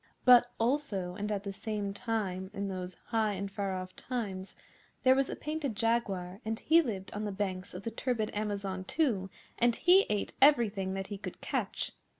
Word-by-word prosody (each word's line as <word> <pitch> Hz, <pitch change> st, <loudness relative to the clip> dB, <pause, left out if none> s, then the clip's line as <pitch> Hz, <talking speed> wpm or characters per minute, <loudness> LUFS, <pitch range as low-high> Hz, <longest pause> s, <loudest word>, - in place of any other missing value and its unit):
But 245 Hz, -1 st, +8 dB
also, 225 Hz, -8 st, 0 dB
and 205 Hz, +3 st, -3 dB
at 200 Hz, -1 st, -1 dB
the 200 Hz, -1 st, -4 dB
same 205 Hz, -1 st, -3 dB
time, 200 Hz, -4 st, -2 dB
in 200 Hz, 0 st, -2 dB
those 185 Hz, -1 st, -5 dB
High 220 Hz, -3 st, +2 dB
and 195 Hz, 0 st, -4 dB
Far 195 Hz, -1 st, -2 dB
Off 185 Hz, 0 st, -6 dB
Times, 200 Hz, -7 st, -4 dB, 0.5 s
there 260 Hz, -, +7 dB
was 270 Hz, 0 st, +2 dB
a -, -, -3 dB
Painted 300 Hz, -6 st, -3 dB
Jaguar, 200 Hz, -4 st, 0 dB
and 220 Hz, +1 st, -2 dB
he 330 Hz, +2 st, +5 dB
lived 200 Hz, -, -4 dB
on 210 Hz, -, -3 dB
the 210 Hz, -, -2 dB
banks 190 Hz, -2 st, -3 dB
of 185 Hz, -, -6 dB
the 230 Hz, -, -3 dB
turbid 230 Hz, -2 st, -1 dB
Amazon 200 Hz, -3 st, -2 dB
too; 210 Hz, -, 0 dB, 0.3 s
and 240 Hz, -1 st, +4 dB
he 365 Hz, +7 st, +5 dB
ate 210 Hz, -1 st, -1 dB
everything 220 Hz, -9 st, +4 dB
that 195 Hz, 0 st, -3 dB
he 205 Hz, -2 st, -5 dB
could -, -, -7 dB
catch. -, -, -2 dB
205 Hz, 185 wpm, -31 LUFS, 190-235 Hz, 0.5 s, But